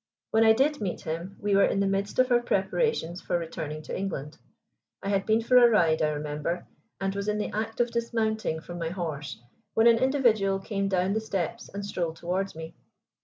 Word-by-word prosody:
When 220 0 +4
I 220 0 +7
did 285 +4 +1
meet 190 -4 -3
him 170 +4 -5
we 205 -1 +1
were 200 - +6
in - - 0
the 200 - +2
midst 195 +1 -1
of 255 0 +3
our 240 0 +5
preparations 190 - 0
for - - 0
returning 160 -2 -5
to - - -5
England. 165 -6 -4 0.7
I 195 - -2
had 195 -1 0
been 220 +1 +3
for 250 +2 +5
a 240 -1 +8
ride, 165 -8 +3
I 155 - +3
remember, 150 +3 -3 0.3
and 195 0 -1
was 200 +1 -4
in 210 0 +1
the 210 - -2
act 220 +1 -3
of 240 0 +2
dismounting 220 -7 -1
from 175 +1 -8
my 165 -1 -2
horse, 160 - -5 0.4
when 225 - +4
an 230 -1 +6
individual 235 -7 +2
came 195 0 -2
down 190 0 +1
the 220 - +1
steps 220 +2 -3
and 200 0 -6
strolled 170 -5 -2
towards 185 +3 -2
me. 160 0 -8
195 Hz, 210 wpm, -27 LUFS, 170-220 Hz, 0.7 s, a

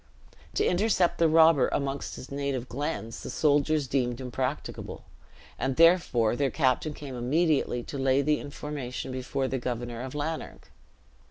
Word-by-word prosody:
To - - +2
intercept 185 -1 +2
the 165 -1 +4
robber 160 -3 +6
amongst 140 0 -3
his 130 - -10
native 140 -3 -2
glens, 135 -3 -4
the - - -7
soldiers 150 0 +2
deemed 125 -2 0
impracticable, 130 +2 -4 0.6
and 135 -1 -1
therefore 165 -10 +4
their 140 +1 +1
captain 145 +2 +1
came 140 -3 -8
immediately 135 0 +1
to 140 - -6
lay 135 +1 +3
the 150 +1 +2
information 145 -3 -6
before 130 +1 -2
the 130 0 -2
Governor 120 -1 -4
of 130 +2 -6
Lanark. 155 +2 -5
140 Hz, 145 wpm, -28 LUFS, 130-150 Hz, 0.6 s, robber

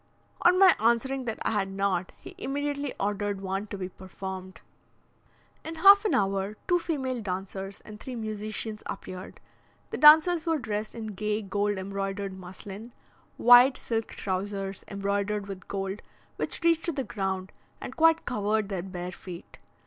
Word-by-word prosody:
On 360 +1 +5
my 375 -1 +8
answering 245 +4 +1
that 225 -2 -3
I - - +1
had 200 -3 0
not, 195 -2 -1
he - - -11
immediately 285 0 -2
ordered 205 0 -1
one 195 +2 -3
to 200 - -6
be 185 -1 -4
performed. 190 0 -8 1.0
In 325 +1 -6
half 400 +5 +7
an 420 - +2
hour 195 +1 0
two 355 -1 +3
female 265 -8 -2
dancers 195 0 -5
and 210 0 -11
three 255 +2 -7
musicians 215 -1 -4
appeared. 185 -1 -7 0.5
The - - -3
dancers 315 +3 +7
were 325 -1 +2
dressed 215 -4 -4
in 225 -1 -5
gay 210 +2 -2
gold 205 +1 0
embroidered 195 0 -3
muslin, 195 +5 -9 0.4
wide 245 +2 +7
silk 225 -1 -2
trousers, 195 0 -4
embroidered 200 +1 -1
with 195 -2 -8
gold, 195 +1 -3 0.3
which - - -3
reached 335 -1 +3
to 340 - +1
the 275 -3 -2
ground, 190 -4 -3 0.3
and - - -7
quite 325 0 +4
covered 215 -3 0
their 190 -3 -2
bare 180 -1 -6
feet. 180 -2 -10
205 Hz, 155 wpm, -28 LUFS, 195-255 Hz, 1.0 s, my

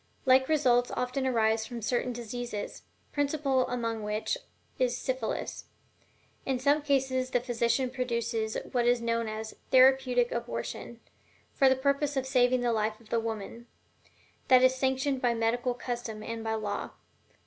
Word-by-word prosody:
Like 260 +1 +5
results 245 -6 +3
often 255 +2 -1
arise 220 -2 +1
from 235 -3 -7
certain 245 +3 0
diseases, 240 -2 -5 0.3
principal 280 -2 +1
among 230 -2 -2
which 210 +1 -1 0.4
is 250 -1 +1
syphilis. 255 -3 -3 0.8
In 265 -1 0
some 285 +4 +2
cases 265 -3 0
the 250 - +2
physician 240 +1 0
produces 235 -3 -2
what 240 -1 +1
is 245 0 +4
known 230 -1 -1
as 220 0 -5
"therapeutic 255 -2 +5
abortion," 235 0 -5 0.5
for 270 -2 +5
the 260 - +4
purpose 280 +2 0
of 265 - 0
saving 255 -1 +3
the 240 -1 +1
life 215 0 -1
of 230 - -20
the 230 - +1
woman 225 +1 -5 0.8
this 255 0 +6
is - - -8
sanctioned 265 +1 0
by 240 -1 +2
medical 240 +2 0
custom 240 -3 -5
and 230 0 -5
by 220 0 -1
law. 210 -2 -4
245 Hz, 150 wpm, -29 LUFS, 230-260 Hz, 0.8 s, this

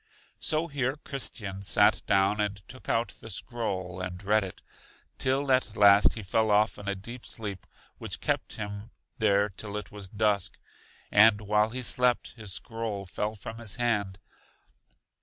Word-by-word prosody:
So 155 +1 +2
here 140 -4 -1
Christian 120 -10 -5
sat 100 - +3
down, 100 +2 +3
and 105 -1 -1
took 130 - -9
out 115 +1 +1
the 115 - -9
scroll 95 -7 -3
and 90 +1 -5
read 105 +1 +3
it, 95 - -8 0.6
till 135 +1 +1
at 130 -4 +2
last 100 0 +6
he 110 - -6
fell 110 +3 +1
off 105 -1 +3
in 100 - -9
a 100 - 0
deep 120 +6 -9
sleep 100 -5 -3 0.3
which - - -3
kept - - -1
him 105 +1 -6 0.3
there 100 +1 +3
till 105 +1 -6
it 105 - -7
was 100 -2 -9
dusk; 105 -2 0 0.5
and 105 0 +6
while 105 +1 +2
he 125 +2 -4
slept 125 0 +2
his 110 -4 -6
scroll 110 -1 -4
fell 105 +4 -3
from 110 +2 -8
his 110 -3 -3
hand. 105 -6 0
105 Hz, 160 wpm, -28 LUFS, 100-115 Hz, 0.6 s, last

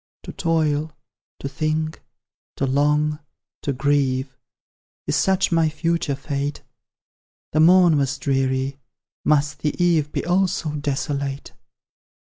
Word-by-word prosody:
To - - -8
toil, 155 -2 0 0.5
to - - -3
think, 155 +2 -2 0.5
to 135 - -1
long, 150 +2 +1 0.4
to 140 - -1
grieve, 135 -1 0 0.7
Is - - 0
such 190 -1 +2
my 165 -2 +3
future 165 -2 -1
fate? 140 +1 -4 0.9
The 155 - +1
morn 175 -1 +6
was 140 0 0
dreary, 135 0 -1 0.4
must 150 0 +2
the 150 -1 -1
eve 165 -4 +2
Be - - -3
also 180 -2 +1
desolate? 140 -1 -3
150 Hz, 110 wpm, -22 LUFS, 140-160 Hz, 0.9 s, morn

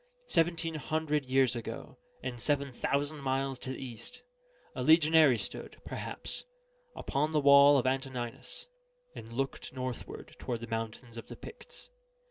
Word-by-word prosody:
Seventeen 165 0 +2
hundred 155 -1 -1
years 130 -1 +3
ago, 120 - -6 0.2
and 120 -2 -4
seven 140 -2 +1
thousand 145 +4 -1
miles 135 -1 -1
to 130 - -6
the 130 - -3
east, 125 - -8 0.5
a - - -4
legionary 155 -2 +6
stood, 100 - -6
perhaps, - - -3 0.5
upon 150 +3 -1
the 150 - +4
wall 140 0 +8
of 130 - +1
Antoninus, 130 - -2 0.5
and 115 - -9
looked 135 +2 -3
northward 130 -2 -6
toward 120 -2 -3
the - - -4
mountains 115 +1 -5
of 115 - -8
the - - -8
Picts. - - -12
135 Hz, 140 wpm, -31 LUFS, 125-150 Hz, 0.5 s, wall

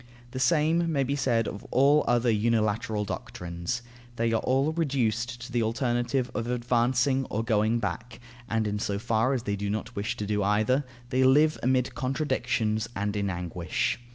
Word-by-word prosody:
The 130 - -5
same 160 +5 +2
may 140 -3 +1
be 140 +2 -1
said 115 -5 +1
of 100 - -6
all 140 +4 +4
other 120 0 +3
unilateral 110 0 0
doctrines. 90 +3 -5 0.3
They 115 -1 0
are 110 - +1
all 135 +4 +1
reduced 120 -7 -1
to 125 - -8
the 120 -1 +1
alternative 120 +2 0
of 115 -1 -3
advancing 125 +2 +1
or 110 - -2
of - - -6
going 110 0 +2
back, 115 +2 -4 0.3
and 110 -1 0
in 105 0 -2
so 100 -1 -1
far 115 +4 +1
as 120 - -3
they 100 -2 -1
do 100 0 -3
not 110 +3 -4
wish 100 +1 -2
to 105 - -3
do 105 0 0
either, 110 +7 +2 0.3
they 130 +1 +3
live 150 +4 +4
amid 130 0 +1
contradictions 125 -4 -1
and 100 +1 -2
in 100 -1 0
anguish. 85 +1 -2
120 Hz, 180 wpm, -27 LUFS, 105-130 Hz, 0.3 s, all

